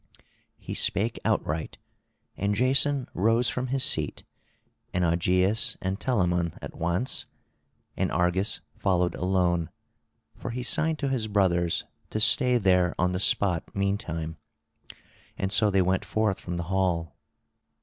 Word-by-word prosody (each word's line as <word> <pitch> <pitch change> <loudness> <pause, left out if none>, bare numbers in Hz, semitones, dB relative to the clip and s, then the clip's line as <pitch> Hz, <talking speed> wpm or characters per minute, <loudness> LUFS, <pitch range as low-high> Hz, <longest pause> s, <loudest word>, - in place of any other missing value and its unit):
He - - -7
spake 110 +3 0
outright; 80 +1 -1 0.6
and 100 +1 -1
Jason 135 +3 +2
rose 115 +5 +2
from 125 +1 -2
his 135 +1 +1
seat, - - 0 0.7
and 90 -1 +2
Augeias 90 +5 +1
and 95 +2 -3
Telamon 90 -9 0
at - - -8
once; 85 +10 -2 0.7
and - - -1
Argus 90 +3 0 0.2
followed 90 -2 +1
alone, 90 -3 0 0.7
for - - -6
he 125 +1 -4
signed 160 +5 +1
to 140 -2 -2
his 125 -5 -1
brothers 90 -5 +1 0.3
to 110 - -2
stay 125 +2 +5
there 90 -4 +2
on 90 0 +1
the 90 - -2
spot 90 -3 +2
meantime; 85 -5 -2 1.0
and 95 - -2
so 105 0 +3
they 95 -2 +3
went 95 +1 0
forth 110 -3 0
from 90 -1 -5
the 85 - -2
hall. 85 -5 0
95 Hz, 135 wpm, -27 LUFS, 90-115 Hz, 1.0 s, stay